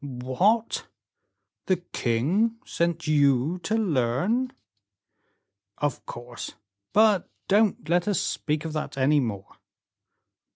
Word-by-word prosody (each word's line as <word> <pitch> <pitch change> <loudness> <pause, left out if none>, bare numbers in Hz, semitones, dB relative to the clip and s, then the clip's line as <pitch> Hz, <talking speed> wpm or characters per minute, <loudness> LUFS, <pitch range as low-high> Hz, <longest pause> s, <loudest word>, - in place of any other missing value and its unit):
"What! 140 - 0 0.8
the 185 - +4
king 175 - 0
sent 170 -1 -1
you 145 +2 +3
to 215 +6 -1
learn 190 - +1 0.6
" 100 +1 -49
"Of 145 -4 -2
course; 120 0 -7 0.4
but 210 -3 +4 0.2
don't 205 -5 +2
let 175 +2 +2
us 205 -4 +2
speak 150 0 -2
of 160 - -4
that 155 -2 -4
any 145 +3 +4
more." 105 -7 -4
155 Hz, 110 wpm, -26 LUFS, 130-200 Hz, 0.8 s, the